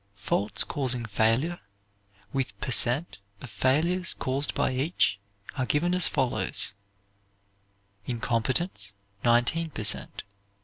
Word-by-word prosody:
Faults 100 Hz, 0 st, +1 dB
causing 125 Hz, -5 st, -1 dB
failure, 115 Hz, +11 st, 0 dB, 0.7 s
with 125 Hz, -7 st, -4 dB
per 130 Hz, -, -4 dB
cent. 125 Hz, -, +4 dB, 0.2 s
of 125 Hz, -, -11 dB
failures 155 Hz, -, 0 dB
caused 135 Hz, +3 st, -1 dB
by -, -, 0 dB
each, 130 Hz, -, 0 dB, 0.4 s
are 130 Hz, -3 st, -3 dB
given 175 Hz, +5 st, 0 dB
as 180 Hz, -2 st, +6 dB
follows: 125 Hz, -5 st, 0 dB, 1.3 s
incompetence, 115 Hz, -, -2 dB, 0.3 s
19 120 Hz, +8 st, +1 dB
per 110 Hz, -, -5 dB
cent. 105 Hz, -, +1 dB
130 Hz, 105 wpm, -26 LUFS, 110-150 Hz, 1.3 s, as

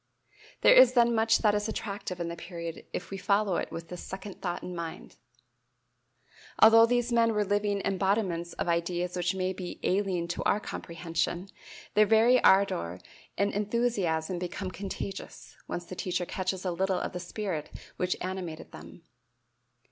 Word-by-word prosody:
There -, -, +7 dB
is 255 Hz, -1 st, +8 dB
then 235 Hz, -1 st, +4 dB
much 225 Hz, 0 st, +4 dB
that 210 Hz, -2 st, +5 dB
is 205 Hz, +1 st, -1 dB
attractive 200 Hz, -4 st, -4 dB
in 170 Hz, -, -2 dB
the 170 Hz, -, -4 dB
period 170 Hz, -1 st, -7 dB
if 180 Hz, -, -5 dB
we 195 Hz, -, -4 dB
follow 200 Hz, -1 st, +2 dB
it -, -, -3 dB
with 165 Hz, 0 st, -7 dB
this 180 Hz, -, -7 dB
second 190 Hz, +1 st, -8 dB
thought 175 Hz, -2 st, -3 dB
in 180 Hz, -, -6 dB
mind. 165 Hz, -1 st, -7 dB, 1.4 s
Although 225 Hz, +1 st, +8 dB
these 245 Hz, 0 st, +1 dB
men 230 Hz, -1 st, +3 dB
were 210 Hz, 0 st, +2 dB
living 205 Hz, 0 st, 0 dB
embodiments 190 Hz, -3 st, 0 dB
of -, -, -3 dB
ideas 175 Hz, +1 st, -1 dB
which 180 Hz, +1 st, 0 dB
may 185 Hz, 0 st, -1 dB
be 180 Hz, -1 st, -7 dB
"alien 185 Hz, -3 st, 0 dB
to 175 Hz, -, -3 dB
our 205 Hz, -, +2 dB
comprehension," 170 Hz, 0 st, -3 dB, 0.4 s
their 215 Hz, 0 st, +5 dB
very 230 Hz, +3 st, +5 dB
ardor 90 Hz, -, +3 dB, 0.4 s
and 200 Hz, 0 st, +1 dB
enthusiasm 200 Hz, -6 st, 0 dB
become 185 Hz, +1 st, -4 dB
contagious, 195 Hz, 0 st, -7 dB
once 175 Hz, -, -4 dB
the 185 Hz, -, -8 dB
teacher 180 Hz, 0 st, -2 dB
catches 185 Hz, +1 st, -3 dB
a 180 Hz, -, 0 dB
little 190 Hz, +2 st, 0 dB
of -, -, -3 dB
the 180 Hz, -, -4 dB
spirit 180 Hz, -3 st, -4 dB, 0.3 s
which 180 Hz, 0 st, 0 dB
animated 180 Hz, -4 st, -5 dB
them. 165 Hz, -, -12 dB
190 Hz, 165 wpm, -29 LUFS, 175-205 Hz, 1.4 s, is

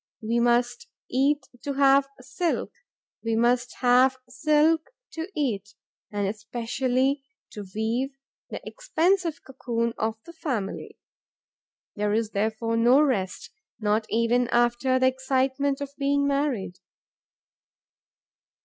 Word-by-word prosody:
We 230 Hz, +2 st, +1 dB
must 240 Hz, -, +1 dB, 0.2 s
eat 280 Hz, +3 st, +2 dB, 0.2 s
to 285 Hz, -, -2 dB
have 275 Hz, 0 st, +4 dB
silk, 340 Hz, +6 st, -2 dB, 0.5 s
we 225 Hz, -1 st, 0 dB
must 245 Hz, +2 st, +2 dB
have 255 Hz, +1 st, +5 dB
silk 305 Hz, +4 st, +2 dB, 0.2 s
to 325 Hz, +3 st, -5 dB
eat 210 Hz, -, -2 dB, 0.4 s
and 205 Hz, -1 st, -1 dB
especially 250 Hz, +6 st, -1 dB, 0.3 s
to 205 Hz, -2 st, -8 dB
weave 240 Hz, +5 st, -1 dB, 0.3 s
the -, -, -7 dB
expensive 370 Hz, -8 st, 0 dB
cocoon 235 Hz, -3 st, -2 dB
of 220 Hz, 0 st, 0 dB
the 335 Hz, -, -11 dB
family. 250 Hz, -12 st, -4 dB, 1.0 s
There 210 Hz, 0 st, 0 dB
is 220 Hz, 0 st, 0 dB
therefore 220 Hz, +2 st, -1 dB
no 240 Hz, +4 st, +5 dB
rest, 220 Hz, -11 st, 0 dB, 0.3 s
not 215 Hz, 0 st, +1 dB
even 235 Hz, +2 st, +2 dB
after 240 Hz, +2 st, +2 dB
the 260 Hz, -, +2 dB
excitement 265 Hz, +2 st, +1 dB
of 280 Hz, -1 st, -4 dB
being 280 Hz, 0 st, +2 dB
married. 275 Hz, -10 st, -1 dB
255 Hz, 115 wpm, -26 LUFS, 225-280 Hz, 1.0 s, have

